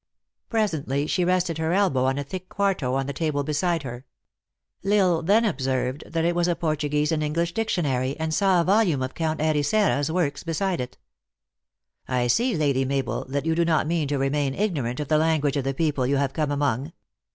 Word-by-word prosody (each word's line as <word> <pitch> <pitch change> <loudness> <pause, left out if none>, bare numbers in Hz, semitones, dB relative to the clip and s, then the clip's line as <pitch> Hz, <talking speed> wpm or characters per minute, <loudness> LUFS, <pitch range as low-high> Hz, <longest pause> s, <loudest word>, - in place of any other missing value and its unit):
Presently 160 - 0
she 180 +3 0
rested 175 -2 +1
her 160 +1 0
elbow 180 -10 +2
on 135 +1 +1
a 145 - -2
thick 185 +6 -7
quarto 185 -11 0
on 135 0 0
the 140 - -4
table 150 -1 -1
beside 155 +2 0
her. 120 -1 -7 0.8
L 200 +1 +1
Isle 180 -5 +3
then 205 +7 +3
observed 130 - -1
that 165 0 -1
it 175 - +2
was 175 0 +1
a 175 - +1
Portuguese 150 -2 0
and 155 -1 0
English 165 +3 -1
dictionary, 145 - -1
and 160 0 -2
saw 190 0 +3
a - - +3
vol 205 +6 +4
ume 150 -10 0
of 130 - -4
Count 160 -1 -2
Ericeira 155 +5 +2
s 145 - -1
works 160 -4 -1
beside 175 0 -1
it. 125 0 -7 0.6
" - - -60
I 125 -1 0
see, 230 - +2
Lady 140 -3 +1
Mabel, 135 -1 -2
that 140 +3 -3
you 160 - +2
do 170 +1 +2
not 160 -3 +2
mean 160 -2 0
to 145 0 -1
re 135 0 +1
main 140 -1 -1
ignorant 145 - -1
of 150 - -3
the 155 +1 +3
language 155 -3 +1
of 140 -2 -1
the 135 - 0
people 145 -4 0
you 140 +1 +2
have 135 -1 0
come 155 -2 -1
among." 145 +1 -1
155 Hz, 215 wpm, -24 LUFS, 135-175 Hz, 0.8 s, vol